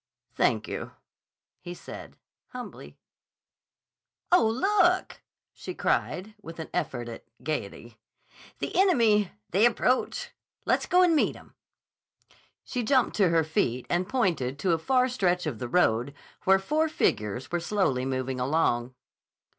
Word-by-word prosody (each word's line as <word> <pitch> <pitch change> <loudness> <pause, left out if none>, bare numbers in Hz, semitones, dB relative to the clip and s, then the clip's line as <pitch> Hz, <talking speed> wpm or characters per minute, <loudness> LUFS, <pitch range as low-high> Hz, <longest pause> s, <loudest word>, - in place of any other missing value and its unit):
"Thank - - +1
you," - - -6 0.7
he 175 0 -8
said - - -10 0.3
humbly. 250 -1 -9 1.3
"Oh, 350 -11 +5
look!" 370 - +2 0.3
she - - -8
cried 200 +4 -1
with 165 -4 -10
an 160 - -7
effort 130 -9 -2
at 115 - -9 0.2
gayety. 120 -5 -5 0.6
"The - - -5
enemy! 230 - +4 0.2
They 195 +5 +3
approach. 250 +2 0 0.3
Let's - - +1
go 365 0 +5
and 345 -2 +4
meet 300 - +2
'em." - - -16 1.1
She 250 - -3
jumped 255 +2 +2
to 195 -4 +4
her 165 -1 +3
feet 130 -5 -1
and 180 +2 0
pointed 170 - 0
to 175 +6 0
a 165 - +2
far 255 +7 +2
stretch 180 -8 0
of 135 -8 -3
the 120 - -4
road 125 -3 +2 0.3
where 190 0 +6
four 305 +11 0
figures 125 - -1
were 175 - 0
slowly 170 -8 0
moving 130 0 -2
along. 125 -3 0
180 Hz, 135 wpm, -27 LUFS, -, 1.3 s, where